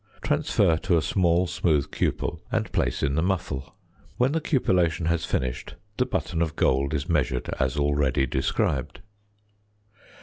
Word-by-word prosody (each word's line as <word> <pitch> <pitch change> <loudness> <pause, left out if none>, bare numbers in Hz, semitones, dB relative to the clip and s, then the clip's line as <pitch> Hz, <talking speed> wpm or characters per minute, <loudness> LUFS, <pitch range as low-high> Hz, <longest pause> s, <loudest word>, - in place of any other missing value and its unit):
Transfer 80 - +2
to 85 +1 +1
a - - +2
small 90 -1 +2
smooth 85 -6 0
cupel - - -1
and - - -1
place - - 0
in 70 - +1
the 80 - +1
muffle. 85 -7 -2 0.4
When 125 +2 +2
the 165 +1 0
cupellation 90 - +1
has 85 -1 0
finished, 65 -2 -3 0.2
the - - +1
button 80 - -2
of 80 -2 -1
gold 70 +3 +1
is 75 +1 -2
measured 70 -6 0
as 65 +1 0
already 70 -2 +1
described. 65 +4 -1
80 Hz, 145 wpm, -25 LUFS, 70-85 Hz, 0.4 s, Transfer